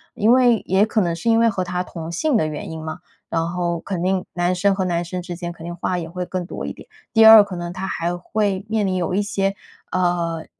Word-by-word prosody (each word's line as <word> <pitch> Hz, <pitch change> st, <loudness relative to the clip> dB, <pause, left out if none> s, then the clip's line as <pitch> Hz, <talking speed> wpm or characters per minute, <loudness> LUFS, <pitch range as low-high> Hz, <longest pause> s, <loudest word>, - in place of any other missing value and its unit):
因 215 Hz, +3 st, +3 dB
为 245 Hz, -4 st, +4 dB
也 190 Hz, +3 st, +3 dB
可 220 Hz, -1 st, +1 dB
能 170 Hz, -2 st, 0 dB
是 230 Hz, +7 st, -2 dB
因 225 Hz, 0 st, +4 dB
为 230 Hz, -, +4 dB
和 185 Hz, -3 st, -2 dB
他 180 Hz, 0 st, -2 dB
同 165 Hz, -2 st, -7 dB
性 265 Hz, -, 0 dB
的 155 Hz, -, +1 dB
原 155 Hz, +1 st, -6 dB
因 160 Hz, -1 st, -7 dB
嘛， 160 Hz, +2 st, -6 dB, 0.3 s
然 165 Hz, 0 st, 0 dB
后 175 Hz, -1 st, -1 dB
肯 185 Hz, -2 st, -4 dB
定 185 Hz, 0 st, 0 dB
男 175 Hz, +1 st, 0 dB
生 200 Hz, +2 st, +2 dB
和 190 Hz, -1 st, -1 dB
男 175 Hz, -1 st, 0 dB
生 180 Hz, +1 st, -4 dB
之 175 Hz, 0 st, -6 dB
间 175 Hz, 0 st, -5 dB
肯 165 Hz, -1 st, -12 dB
定 175 Hz, 0 st, -5 dB
话 180 Hz, +1 st, -2 dB
也 165 Hz, -1 st, -6 dB
会 180 Hz, +1 st, -4 dB
更 180 Hz, -1 st, -4 dB
多 -, -, -6 dB
一 -, -, -4 dB
点。 -, -, -14 dB, 0.3 s
第 225 Hz, -1 st, +6 dB
二， 220 Hz, -2 st, +11 dB
可 195 Hz, -3 st, -7 dB
能 175 Hz, 0 st, -5 dB
他 190 Hz, +1 st, -5 dB
还 175 Hz, -1 st, -2 dB
会 200 Hz, +1 st, -1 dB
面 215 Hz, -3 st, +1 dB
临 185 Hz, -, -1 dB
有 180 Hz, 0 st, -1 dB
一 205 Hz, -, +2 dB
些， 195 Hz, -1 st, -1 dB, 0.4 s
呃 170 Hz, -3 st, 0 dB
180 Hz, 275 characters per minute, -21 LUFS, 170-200 Hz, 0.4 s, 二